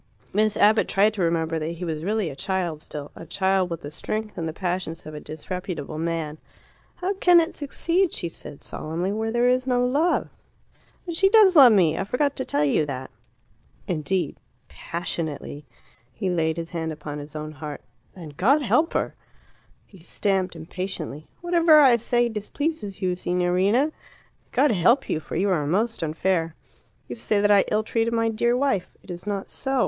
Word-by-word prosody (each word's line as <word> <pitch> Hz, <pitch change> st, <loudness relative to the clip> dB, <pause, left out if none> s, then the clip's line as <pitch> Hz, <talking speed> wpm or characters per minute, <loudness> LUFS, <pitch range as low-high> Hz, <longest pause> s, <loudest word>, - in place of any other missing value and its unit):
Miss 215 Hz, +1 st, +2 dB
Abbott 215 Hz, +1 st, +4 dB
tried 205 Hz, +2 st, +3 dB
to 205 Hz, -, -3 dB
remember 165 Hz, -1 st, 0 dB
that 160 Hz, +2 st, -3 dB
he 175 Hz, +2 st, -6 dB
was 160 Hz, -2 st, -3 dB
really 205 Hz, -3 st, -1 dB
a -, -, -9 dB
child 170 Hz, +1 st, -2 dB
still 145 Hz, -2 st, -7 dB
a -, -, -9 dB
child 190 Hz, +2 st, +1 dB
with 170 Hz, -2 st, -5 dB
the 145 Hz, -, -7 dB
strength 215 Hz, +7 st, -4 dB
and 165 Hz, -, -3 dB
the -, -, -2 dB
passions 175 Hz, -1 st, -3 dB
of 155 Hz, -, -8 dB
a 150 Hz, -, -6 dB
disreputable 160 Hz, -1 st, -6 dB
man. 160 Hz, -2 st, -3 dB, 0.6 s
"How 370 Hz, +2 st, -2 dB
can 360 Hz, -3 st, +5 dB
it 330 Hz, +1 st, 0 dB
succeed," 335 Hz, +5 st, 0 dB
she 170 Hz, -, -3 dB
said 145 Hz, -3 st, -10 dB
solemnly, 170 Hz, +5 st, -3 dB
"where 220 Hz, +2 st, -2 dB
there 240 Hz, +1 st, +2 dB
is 255 Hz, +1 st, +2 dB
no 245 Hz, -1 st, +2 dB
love?" 300 Hz, +7 st, +1 dB, 0.8 s
"But 340 Hz, -2 st, -4 dB
she 390 Hz, +2 st, +5 dB
does 410 Hz, -4 st, +6 dB
love 265 Hz, -6 st, +9 dB
me! 170 Hz, -6 st, +3 dB
I -, -, 0 dB
forgot 280 Hz, +7 st, 0 dB
to 260 Hz, -, -1 dB
tell 145 Hz, +1 st, +1 dB
you 145 Hz, +2 st, +2 dB
that." 130 Hz, -2 st, -5 dB, 0.8 s
"Indeed." 175 Hz, -1 st, -1 dB, 0.3 s
"Passionately." 155 Hz, -4 st, -5 dB, 0.4 s
He 190 Hz, -, -2 dB
laid 160 Hz, -2 st, 0 dB
his 165 Hz, 0 st, -5 dB
hand 165 Hz, -2 st, -3 dB
upon 150 Hz, -1 st, -6 dB
his 145 Hz, +1 st, -9 dB
own 155 Hz, 0 st, -5 dB
heart. 150 Hz, 0 st, -7 dB, 0.3 s
"Then 170 Hz, -5 st, -9 dB
God 275 Hz, -, +3 dB
help 255 Hz, -, +2 dB
her!" -, -, -1 dB, 0.7 s
He 195 Hz, -, -17 dB
stamped 185 Hz, +1 st, -1 dB
impatiently. 160 Hz, -2 st, -6 dB
"Whatever 335 Hz, -3 st, +5 dB
I 260 Hz, -5 st, +6 dB
say 240 Hz, +1 st, +1 dB
displeases 215 Hz, -, -4 dB
you, 180 Hz, -1 st, +1 dB
Signorina. 180 Hz, -, +1 dB, 0.6 s
God 295 Hz, -, +3 dB
help 230 Hz, +8 st, +3 dB
you, -, -, 0 dB
for -, -, -8 dB
you 195 Hz, +4 st, +1 dB
are 150 Hz, -5 st, 0 dB
most 220 Hz, +8 st, 0 dB
unfair. 165 Hz, +1 st, 0 dB, 0.5 s
You 120 Hz, -, -6 dB
say 200 Hz, -, 0 dB
that 205 Hz, 0 st, +3 dB
I 200 Hz, -1 st, +5 dB
ill 215 Hz, +1 st, +2 dB
treated 230 Hz, +1 st, 0 dB
my 230 Hz, 0 st, +2 dB
dear 235 Hz, +2 st, +1 dB
wife. 265 Hz, -9 st, 0 dB
It 190 Hz, -, -9 dB
is 175 Hz, +3 st, -8 dB
not 200 Hz, -1 st, -2 dB
so. 270 Hz, -1 st, -2 dB
190 Hz, 185 wpm, -24 LUFS, 160-235 Hz, 0.8 s, love